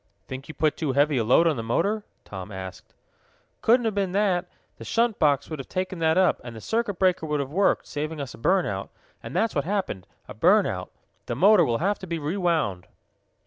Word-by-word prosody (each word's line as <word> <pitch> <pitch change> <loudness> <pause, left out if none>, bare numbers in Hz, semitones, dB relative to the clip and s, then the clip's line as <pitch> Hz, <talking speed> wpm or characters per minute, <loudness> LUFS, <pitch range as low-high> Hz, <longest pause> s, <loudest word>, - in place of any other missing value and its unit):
"Think 130 +1 -7
you 155 - -9
put 155 -1 +1
too 150 -5 -1
heavy 145 +1 +3
a 115 - +2
load 125 +9 +4
on 160 -5 +2
the - - -2
motor?" 200 - 0 0.2
Tom 95 0 -8
asked. 95 -1 -9 0.7
"Couldn't 240 +1 +4
have 220 - +1
been 195 -2 -1
that. 190 -3 +1 0.3
The - - -10
shunt 230 -2 +1
box 145 -4 +2
would 155 -3 -6
have 135 - -8
taken 185 -1 -3
that 160 +1 +2
up, 185 -1 +3
and 120 -1 -8
the - - -8
circuit 220 - -1
breaker 185 -3 +2
would 150 -1 0
have 140 -1 -3
worked, 195 +5 +2
saving 150 +1 -4
us 135 -4 -5
a - - -13
burn 185 +10 +2
out, - - -4 0.3
and - - -8
that's 225 -1 +1
what 140 - 0
happened 185 - -3 0.2
a - - -8
burn - - +4
out. - - -4 0.4
The - - -2
motor 200 -1 +6
will 120 -6 +1
have 200 - 0
to 190 - -8
be 170 -1 -2
rewound." 155 - -1
165 Hz, 225 wpm, -25 LUFS, 135-195 Hz, 0.7 s, motor